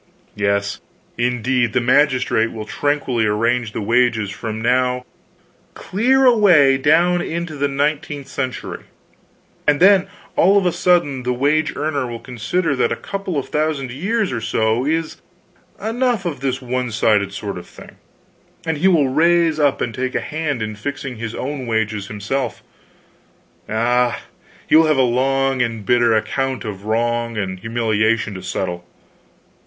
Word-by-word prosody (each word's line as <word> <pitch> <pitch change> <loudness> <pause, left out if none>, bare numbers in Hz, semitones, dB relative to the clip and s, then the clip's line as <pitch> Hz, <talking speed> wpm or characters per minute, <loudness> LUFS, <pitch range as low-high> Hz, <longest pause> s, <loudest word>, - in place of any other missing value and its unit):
Yes, 100 0 -1 0.3
indeed! 120 -1 0
the - - +3
magistrate 125 -3 +2
will 110 -1 -6
tranquilly 130 -5 0
arrange 115 +2 0
the 110 - -4
wages 115 -2 +2
from 110 +1 -5
now 125 +2 +1 0.7
clear 260 +7 +2
away 175 - +5
down 170 +5 +3
into 170 -1 -4
the 145 0 0
nineteenth 145 +1 -2
century; 130 -3 -5 0.8
and 145 -1 +3
then 195 0 +5 0.3
all 195 +3 +5
of 195 - +2
a 180 - +3
sudden 170 -7 +1
the 125 0 -1
wage 150 +4 +1
earner 145 -3 -1
will 120 -1 -6
consider 130 +8 -2
that - - +1
a - - +1
couple 195 -5 -4
of 140 - -3
thousand 150 -4 -1
years 200 - -1
or 115 - -3
so 115 +3 0
is 160 +1 -2 0.6
enough 235 -2 -1
of 165 -6 -3
this 135 0 -2
one 125 0 -2
sided 105 -2 +2
sort 100 -2 -5
of - - -13
thing; - - -14 0.7
and 160 -2 -2
he 190 - +3
will 165 -7 +4
rise 165 +2 +3
up 145 -2 +2
and 115 - -2
take 130 +2 -3
a - - +2
hand 150 -6 -3
in 110 0 -4
fixing 135 +2 -5
his 115 0 -5
wages 110 -7 -2
himself. 110 +5 -3 1.1
Ah, 120 +2 +1 0.4
he - - +3
will 160 0 +6
have 155 -2 +2
a - - +4
long 135 +2 +1
and 115 -3 -2
bitter 120 0 +3
account 130 +3 -1
of 100 -2 -6
wrong 115 +1 -1
and 95 -3 -3
humiliation 110 0 0
to 95 - -7
settle." 90 -1 -4
130 Hz, 150 wpm, -19 LUFS, 115-155 Hz, 1.1 s, will